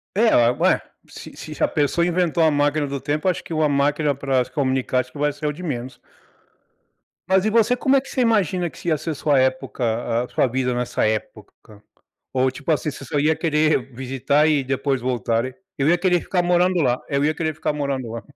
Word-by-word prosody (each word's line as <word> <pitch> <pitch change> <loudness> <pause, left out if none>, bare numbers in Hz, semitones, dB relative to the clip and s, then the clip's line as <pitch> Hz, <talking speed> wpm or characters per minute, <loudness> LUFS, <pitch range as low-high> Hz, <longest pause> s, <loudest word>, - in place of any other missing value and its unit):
É 225 +3 +4 0.3
ué, - - +3 0.3
se - - -11 0.2
se - - -2
a - - +4
pessoa 150 +4 +1
inventou 175 -2 +1
a 160 - +4
máquina 145 +1 +1
do 140 0 -4
tempo, 150 +6 -2
acho 180 - -1
que - - -7
uma 155 -1 +2
máquina 145 +1 +1
para 135 -2 0
se - - -16
comunicar, 130 -3 0
acho 125 0 -4
que - - -10
vai 145 +1 +1
ser 145 +1 -8
o 150 - -1
de 175 +5 -10
menos. 130 -6 -5 1.3
Mas 190 +1 +3
e - - +3
você, 230 +2 +3
como 265 +2 +2
é 270 - +4
que 270 - -13
você 260 - -1
imagina 190 -7 +1
que - - -17
se - - -9
ia 160 -2 +2
ser 160 +2 -4
sua 145 -1 +2
época, 120 -3 -1
a - - -7
sua - - +1
vida 125 0 -1
nessa 120 0 -1
época 110 -1 -5 0.5
ou 130 0 +2
tipo 140 +5 -6
assim 155 0 -1
você 140 - -10
só 140 +3 -2
ia 155 +2 +2
querer 155 -4 +1
visitar 135 +4 +1
e 150 -3 +2
depois 135 0 -1
voltarem? 120 0 -1 0.2
Eu 140 +1 +2
ia 175 +2 +4
querer 180 -1 +2
ficar 180 +1 -1
morando 180 +1 +2
lá 125 -2 +2
eu 140 0 0
ia 155 +1 +1
querer 155 0 -2
ficar 155 - -2
morando 140 -5 -3
lá. 115 -1 -6
145 Hz, 220 wpm, -22 LUFS, 130-165 Hz, 1.3 s, É